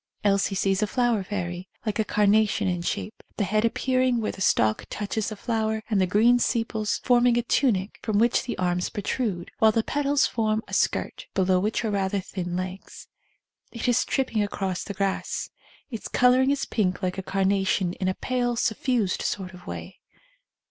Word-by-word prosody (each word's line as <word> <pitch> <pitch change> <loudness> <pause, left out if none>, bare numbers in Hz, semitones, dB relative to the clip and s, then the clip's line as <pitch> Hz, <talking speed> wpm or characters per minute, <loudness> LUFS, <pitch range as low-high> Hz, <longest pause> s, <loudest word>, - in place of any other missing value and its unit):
Elsie 200 -1 +2
sees 195 +1 +1
a 215 - +2
flower 240 -3 +1
fairy, 180 -2 -4 0.2
like 215 0 -2
a - - +4
carnation 210 0 +2
in 175 -2 -1
shape, 210 +5 -4 0.2
the 210 - +1
head 215 +3 +1
ap 230 - +1
pearing 255 -2 +1
where 215 - -1
the 195 - -11
stalk 110 - +2
touches 210 +1 -2
the 215 - -6
flower 220 0 -1
and 200 -3 +3
the 185 - +2
green 230 +6 +4
sepals 225 -2 0
forming 245 -1 +4
a 240 - +1
tunic 215 -6 +1
from 215 -2 0
which 235 +3 +3
the 250 - -5
arms 180 -1 0
protrude, 205 -4 -3
while 220 0 +6
the 225 +1 +1
petals 290 +2 +1
form 220 -1 0
a - - -12
skirt, - - -1
below 185 -1 +3
which 215 +4 -1
are 215 - 0
rather 195 0 0
thin 180 -2 -5
legs. 185 +1 -6 0.6
It 235 +1 -4
is 245 0 +3
tripping 255 -5 0
across 195 -3 -2
the 200 - -6
grass. 195 -1 -2 0.4
Its 225 - -5
colouring 255 +1 +4
is 280 0 0
pink 190 -3 -1
like 185 +1 -1
a - - -1
carnation 190 -1 +1
in 185 - -3
a 185 - 0
pale, 245 -1 -1
suffused 230 -3 0
sort 190 -2 -3
of 180 0 -14
way. - - -7
210 Hz, 185 wpm, -25 LUFS, 190-235 Hz, 0.6 s, while